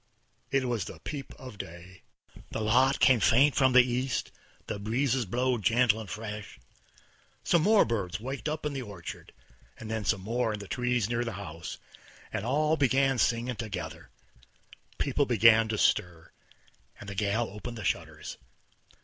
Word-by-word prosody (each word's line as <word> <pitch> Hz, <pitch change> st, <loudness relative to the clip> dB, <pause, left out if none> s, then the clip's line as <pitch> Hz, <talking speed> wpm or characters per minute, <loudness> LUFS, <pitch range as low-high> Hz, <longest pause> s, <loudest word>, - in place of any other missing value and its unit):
It 135 Hz, -1 st, +1 dB
was 115 Hz, -6 st, -1 dB
the -, -, -9 dB
peep 145 Hz, -3 st, -6 dB
of 125 Hz, -6 st, -11 dB
day. 85 Hz, +2 st, -10 dB, 0.5 s
The -, -, -4 dB
light 130 Hz, +5 st, +3 dB
came 130 Hz, -3 st, +5 dB
faint 135 Hz, +7 st, +5 dB
from 130 Hz, -2 st, +3 dB
the 125 Hz, 0 st, +8 dB
east, 125 Hz, +1 st, -2 dB, 0.3 s
the 105 Hz, -, -4 dB
breezes 120 Hz, +3 st, 0 dB
blowed 125 Hz, +2 st, 0 dB
gentle 115 Hz, 0 st, +3 dB
and 110 Hz, -4 st, -8 dB
fresh, 105 Hz, -, -7 dB, 0.8 s
some 170 Hz, -, +3 dB
more 210 Hz, +4 st, +5 dB
birds 105 Hz, -6 st, -2 dB
waked 135 Hz, +6 st, -4 dB
up 155 Hz, 0 st, -4 dB
in 150 Hz, -, -1 dB
the 135 Hz, -, -3 dB
orchard, 100 Hz, -8 st, -9 dB, 0.5 s
then 110 Hz, -1 st, -4 dB
some 100 Hz, -1 st, +1 dB
more 115 Hz, +2 st, -1 dB
in 105 Hz, -, -5 dB
the 100 Hz, -, -8 dB
trees 125 Hz, -2 st, 0 dB
near 120 Hz, 0 st, -1 dB
the 115 Hz, -, -4 dB
house, 85 Hz, -4 st, -7 dB, 0.6 s
and 100 Hz, -, -2 dB
all 150 Hz, +4 st, +2 dB
begun 135 Hz, -1 st, +2 dB
singin' 120 Hz, +1 st, +1 dB
together. 100 Hz, -6 st, -6 dB, 0.9 s
People 140 Hz, 0 st, +1 dB
began 115 Hz, -1 st, +5 dB
to 110 Hz, -1 st, -2 dB
stir, 85 Hz, -4 st, 0 dB, 0.7 s
and -, -, -10 dB
the 100 Hz, -, -5 dB
gal 105 Hz, +4 st, 0 dB
opened 115 Hz, +3 st, -7 dB
the 110 Hz, -, -6 dB
shutters. -, -, -3 dB
115 Hz, 160 wpm, -29 LUFS, 105-130 Hz, 0.9 s, the